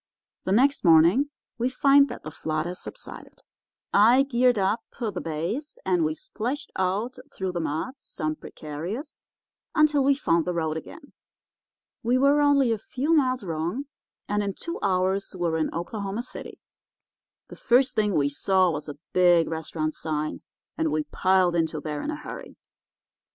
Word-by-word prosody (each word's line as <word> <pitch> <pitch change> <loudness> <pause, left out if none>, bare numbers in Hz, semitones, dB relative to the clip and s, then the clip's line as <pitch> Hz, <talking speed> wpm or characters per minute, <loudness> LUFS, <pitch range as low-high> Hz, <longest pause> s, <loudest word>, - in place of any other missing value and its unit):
"The 185 - -1
next 270 +7 +3
morning 175 - +5 0.3
we 245 +2 +1
find 275 +2 +5
that 245 - -8
the 155 - -7
flood 155 0 -2
has 180 +1 -5
subsided. - - -10 0.5
I 235 +6 +6
geared 250 -3 +2
up 200 +4 +1 0.2
the 230 -4 -1
bays, 170 - -4
and 180 -3 +2
we 155 0 0
splashed 245 - -5
out 200 +7 -1
through 190 -1 -3
the 175 - -3
mud, 160 - -2
some 155 -9 -4
precarious, 170 - -7 0.5
until 305 -3 +4
we 280 +1 +4
found 170 - +1
the 180 - -2
road 160 -2 -1
again. 285 - -9 0.9
We 245 +1 +2
were 280 +2 +4
only 280 -4 +4
a 225 - 0
few 270 +8 -1
miles 255 -6 +2
wrong, 170 - -2 0.4
and 205 0 0
in 200 -1 -3
two 335 +1 -6
hours 190 0 0
we 180 - -8
were 160 -1 0
in 160 - 0
Oklahoma 200 +5 -4
City. 255 - -9 0.9
The - - -9
first 250 +2 +3
thing 210 -3 +1
we 140 -1 +3
saw 185 +5 +2
was 150 -1 -5
a 145 - -7 0.2
big 175 -2 +5
restaurant 155 -1 -3
sign, 155 -1 -3 0.4
and 160 -1 +1
we 155 0 0
piled 185 -2 +3
into 160 -2 0
there 150 -1 -4
in - - -4
a 310 - -2
hurry. - - -9
190 Hz, 165 wpm, -26 LUFS, 160-255 Hz, 0.9 s, I